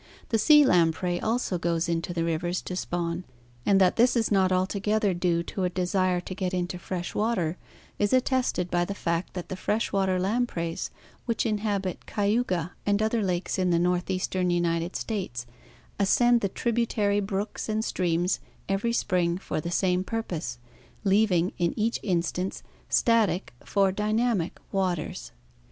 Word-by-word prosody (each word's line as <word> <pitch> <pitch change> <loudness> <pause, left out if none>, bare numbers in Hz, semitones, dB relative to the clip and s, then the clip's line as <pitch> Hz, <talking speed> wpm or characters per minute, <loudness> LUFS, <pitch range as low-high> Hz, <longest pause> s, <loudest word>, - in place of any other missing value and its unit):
The 225 - +2
sea 295 +5 +7
lamprey 175 -2 +2
also 220 -5 0
goes 170 +1 0
into 170 +1 -1
the 170 -1 -1
rivers 170 +2 -1
to 180 - -5
spawn, 175 -1 -2 0.4
and 195 -1 +5
that 185 -2 +4
this 240 +2 +4
is 225 -2 +1
not 190 -2 +3
altogether 200 +2 +1
due 175 -1 +1
to 190 +2 -4
a 180 - +2
desire 180 0 +1
to 185 - -6
get 185 -1 -2
into 180 0 -2
fresh 175 0 -4
water 200 -7 0 0.4
is 205 -1 +2
attested 255 -8 +1
by 175 0 +2
the 200 +3 -4
fact 170 -1 -2
that 180 - -5
the 190 - -3
fresh 210 +4 -1
water 190 -2 +2
lampreys 185 -5 -1 0.4
which 230 0 0
inhabit 205 -4 -2
Cayuga 200 -5 0
and 205 0 +2
other 220 +1 +1
lakes 185 -1 -1
in 185 -1 +2
the 170 - +3
northeastern 180 +1 0
United 170 0 0
States 180 - -3 0.5
ascend 240 +4 +4
the 200 - 0
tributary 220 -2 0
brooks 205 +2 -3
and 215 +1 0
streams 175 0 0 0.3
every 200 +4 0
spring 175 -6 +1
for 185 - -3
the 170 - -4
same 180 +1 +1
purpose, 190 - -4 0.5
leaving 195 -3 +3
in 170 -1 0
each 225 +2 0
instance 180 0 -1 0.3
static 210 - +2
for 195 -2 +2
dynamic 210 -2 0
waters. 175 - -2
185 Hz, 155 wpm, -27 LUFS, 175-210 Hz, 0.5 s, sea